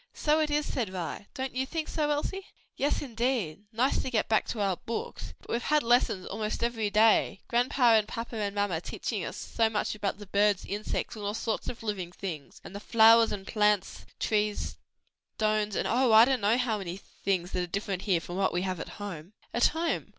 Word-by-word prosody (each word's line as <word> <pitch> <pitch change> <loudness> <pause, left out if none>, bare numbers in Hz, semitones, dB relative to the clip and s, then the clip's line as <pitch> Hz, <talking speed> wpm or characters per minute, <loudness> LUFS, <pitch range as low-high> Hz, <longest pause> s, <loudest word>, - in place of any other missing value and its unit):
"So 305 +1 +2
it 310 -1 +1
is!" 295 0 +1
said 235 -7 -2
Vi, 185 +2 -5
"don't 265 0 -3
you 260 +1 -1
think 320 +1 -3
so, 300 -2 -1
Elsie?" 380 +7 -2 0.3
"Yes, 285 +2 0
indeed! 230 - -2
nice 245 +4 +1
to - - -3
get 230 -4 0
back 220 - +2
to 225 - -4
our 195 -3 +1
books, 230 - -6
but - - -11
we've 235 - 0
had 300 +4 +2
lessons 230 -5 +2
almost 215 +2 -3
every 225 -3 0
day, 215 -1 +3
grandpa 245 0 +3
and 215 -1 +4
papa 230 +2 -5
and 205 -1 -2
mamma 200 -5 0
teaching - - -4
us - - -5
so 225 -1 0
much 215 -1 -1
about 205 -2 -2
the 205 - -10
birds, 200 0 +2
insects, 210 +3 -3
and 215 - -7
all 205 +1 -2
sorts 225 -1 -2
of 235 - -8
living 195 -5 -3
things, 165 -6 -7
and - - -10
the - - -4
flowers 225 +1 +6
and 195 -2 -5
plants, 210 -2 +1
trees, 210 -1 0 0.6
stones 215 -1 0
and - - 0
oh, 250 +1 +3
I 220 +1 +9
don't 260 -2 +1
know 210 +4 +3
how 235 -4 0
many 180 -2 -5
things 185 -2 -3
that 180 - -1
are 180 - -2
different 195 0 -3
here 190 -5 +2
from 175 +2 -6
what 195 -1 +1
we 175 +1 0
have 185 -2 -2
at - - -7
home." 195 -3 -7 0.2
"At 240 - +5
home! 330 +1 -2
215 Hz, 215 wpm, -29 LUFS, 195-240 Hz, 0.6 s, I